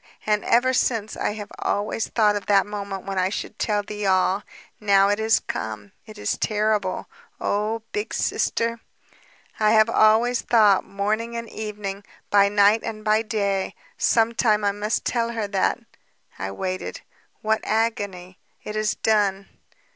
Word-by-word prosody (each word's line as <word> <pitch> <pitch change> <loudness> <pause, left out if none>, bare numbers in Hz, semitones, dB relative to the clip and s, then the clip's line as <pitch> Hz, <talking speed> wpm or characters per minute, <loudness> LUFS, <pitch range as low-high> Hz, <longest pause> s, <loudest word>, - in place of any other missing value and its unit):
And 210 -1 +1
ever 250 +2 +3
since, 225 -4 0
I - - -1
have 205 -2 -8
always 210 +2 -1
thought 210 -2 +2
of 205 - -4
that 200 -2 +4
moment 200 -2 -6
when 195 -1 -2
I 185 0 +2
should 200 - -6
tell 210 -1 0
thee 210 0 -4
all. 190 +1 +2 0.4
Now 200 -2 +4
it 205 +1 +1
is 220 +1 +3
come. 105 -2 -5 0.2
It 215 -1 -11
is - - -2
terrible. 210 -3 0 0.3
Oh... 215 +2 -1
Big 415 +1 -3
Sister! 230 0 0 0.8
"I 215 0 +4
have 220 +1 +5
always 230 +3 +4
thought, 210 -5 +4
morning 215 +4 -2
and 230 0 -5
evening, 210 -2 -6 0.3
by 200 -1 +5
night 205 +2 +4
and 215 -1 -6
by 215 +1 +3
day, 200 -3 -1 0.2
'Some 230 - +2
time 215 -3 +2
I 200 - +3
must 205 +2 -2
tell 235 -1 0
her 220 -3 -2
that 195 -2 +1 0.3
...' - - -30
I 95 - -3
waited... 185 - -4 0.4
What 220 0 +1
agony!... 205 -5 -2 0.2
It 210 - -6
is 215 0 0
done. 200 -3 +1
210 Hz, 160 wpm, -23 LUFS, 200-220 Hz, 0.8 s, have